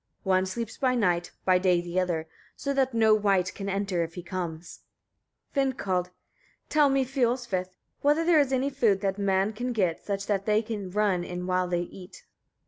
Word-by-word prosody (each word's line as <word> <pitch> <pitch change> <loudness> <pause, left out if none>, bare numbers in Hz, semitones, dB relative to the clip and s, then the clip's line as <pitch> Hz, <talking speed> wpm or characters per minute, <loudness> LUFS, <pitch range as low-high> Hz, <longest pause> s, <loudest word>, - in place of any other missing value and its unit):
One 190 -1 +2
sleeps 225 +3 -5
by 255 -2 +2
night, 175 -7 +1 0.2
by 185 -1 +4
day 180 -1 +3
the 175 +1 -2
other, 170 -3 -1 0.3
so 280 - -2
that 265 -3 +1
no 220 -1 +5
wight 195 -3 +2
can 195 -1 -5
enter 195 -2 -1
if 165 0 -7
he 180 - -6
comes. 175 -2 -5 0.8
Vindkald. 235 -10 0
18. 180 - -29 0.6
Tell 295 -2 +4
me, 270 -1 +2
Fiolsvith! 245 -6 0
etc., 185 0 -9 0.3
whether 295 +3 +3
there 335 -2 +5
is 280 -2 +2
any 265 +2 +1
food 225 -8 +2
that 195 0 -1
men 195 +1 +1
can 245 +3 -3
get, 185 -7 0
such 200 -1 -3
that 200 -1 -1
they 215 +1 +3
can 210 -4 -5
run 195 -2 +1
in 180 0 -5
while 185 0 +1
they 175 -1 0
eat? 180 +1 -10
195 Hz, 195 wpm, -27 LUFS, 180-240 Hz, 0.8 s, no